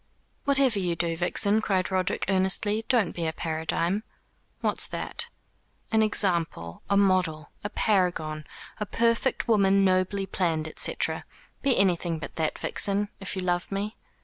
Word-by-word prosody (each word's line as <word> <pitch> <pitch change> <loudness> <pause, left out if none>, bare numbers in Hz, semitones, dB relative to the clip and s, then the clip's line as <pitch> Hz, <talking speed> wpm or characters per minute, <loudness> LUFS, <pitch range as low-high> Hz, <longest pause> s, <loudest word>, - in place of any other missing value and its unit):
"Whatever 275 -6 +3
you 175 -3 -1
do, 170 0 -1
Vixen," 200 +5 +3
cried 190 -3 0
Roderick 185 -1 0
earnestly, 195 +3 +1
"don't 230 -9 +3
be 170 -2 -3
a - - 0
paradigm." 165 +5 -1 0.6
"What's - - +1
that?" - - -4 0.6
"An 220 0 +4
example, 170 - +1
a 200 - +3
model, 185 -6 +2
a 205 - -2
paragon, 175 -8 0 0.3
a 210 - -3
perfect 230 +5 +1
woman 195 -3 +4
nobly 185 +1 +1
planned, 160 -4 -1
&c. - - -1 0.7
Be 275 -3 +2
anything 175 -3 +2
but 155 - -8
that, 160 -2 -1
Vixen, 205 +1 0
if 195 -1 -5
you 190 - -3
love 175 +1 -1
me." 205 +2 -3
190 Hz, 145 wpm, -27 LUFS, 170-205 Hz, 0.7 s, An